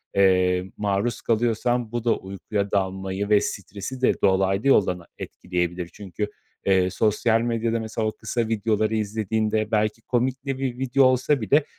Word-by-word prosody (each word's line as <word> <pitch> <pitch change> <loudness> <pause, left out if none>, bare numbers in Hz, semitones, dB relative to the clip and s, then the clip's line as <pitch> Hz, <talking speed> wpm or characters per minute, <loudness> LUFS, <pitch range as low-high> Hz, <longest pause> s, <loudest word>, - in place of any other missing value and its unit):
eee, 90 -1 +3
maruz 105 +3 -1
kalıyorsan 120 +1 0
bu 120 -1 -3
da 120 -1 +2
uykuya 100 +1 -4
dalmayı 95 +1 -1
ve 105 -1 +5
stresi 100 +6 -5
de 130 - +2
dolaylı 95 +4 +2
yoldan 95 -9 +4
a 85 - -16
etkileyebilir. 90 -1 -3
Çünkü, 100 0 -4 0.4
eee, 95 -2 +3
sosyal 110 +3 +2
medyada, 115 -1 0
mesela, 110 0 -2
o - - 0
kısa 115 +1 -2
videoları 110 0 0
izlediğinde 110 0 -1
belki 110 +1 +1
komik 130 +3 -1
de 135 -1 -2
bir 130 -3 -2
video 135 +1 +2
olsa 130 +2 +2
bile, 140 +8 +3
110 Hz, 155 wpm, -24 LUFS, 95-120 Hz, 0.4 s, ve